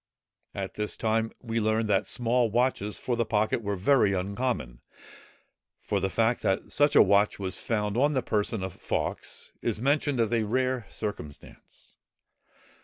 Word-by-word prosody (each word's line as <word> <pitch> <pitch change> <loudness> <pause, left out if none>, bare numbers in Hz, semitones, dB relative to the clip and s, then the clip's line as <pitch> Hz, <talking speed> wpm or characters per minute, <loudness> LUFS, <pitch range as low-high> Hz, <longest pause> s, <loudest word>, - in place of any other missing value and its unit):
At - - -4
this 105 0 -3
time, 110 0 0
we 115 -1 -1
learn, 110 +1 +1
that 100 -1 +1
small 120 0 +1
watches 115 -3 0
for 125 - -2
the 120 - +1
pocket 110 +1 0
were 100 -2 -2
very 105 +1 +3
uncommon; 95 - -2 1.0
for 100 - -1
the 95 +1 -1
fact, 115 +4 +1
that 95 0 -1
such 145 +4 +3
a - - +9
watch 100 +1 +3
was 95 -2 -3
found 105 -2 -1
on 145 +4 +2
the 130 - +1
person 105 -1 0
of 95 -2 -4
Fawkes, - - -4
is 110 -3 -1
mentioned 140 +1 +1
as 115 0 +1
a 115 - +2
rare 125 +1 -1
circumstance. 105 -9 -8
110 Hz, 160 wpm, -27 LUFS, 100-120 Hz, 1.0 s, a